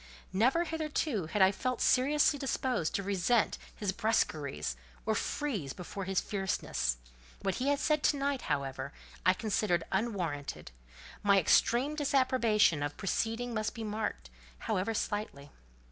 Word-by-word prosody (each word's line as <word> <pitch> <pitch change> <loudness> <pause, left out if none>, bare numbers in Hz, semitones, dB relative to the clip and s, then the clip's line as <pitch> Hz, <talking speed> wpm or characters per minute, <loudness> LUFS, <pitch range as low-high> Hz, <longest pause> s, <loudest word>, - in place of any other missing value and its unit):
Never 255 - +3
hitherto 305 - -2
had 200 +3 +3
I 190 - +6
felt 255 +5 -2
seriously 285 +3 +3
disposed 255 - -1
to 200 - -1
resent 200 +4 +1 0.2
his 205 -3 -1
brusqueries, 145 - 0 0.3
or - - +2
freeze 210 - -2
before 190 +2 -6
his 190 0 +1
fierceness; 190 - -1 0.5
what 195 -1 0
he 265 - 0
had 285 0 +3
said 300 +1 +1
to 290 - +3
night, 275 -1 -1
however, 140 -1 -2 0.3
I 185 - +6
considered 200 -5 0
unwarranted: 185 -9 -2 0.5
my 200 -1 +5
extreme 245 - +3
disapprobation 255 - +3
of 145 0 -2
the - - -26
proceeding 225 +5 -1
must 215 +1 -2
be 225 - -5
marked, 210 - -3 0.3
however 195 - -1
slightly. 205 -11 -3
210 Hz, 140 wpm, -31 LUFS, 175-255 Hz, 0.5 s, I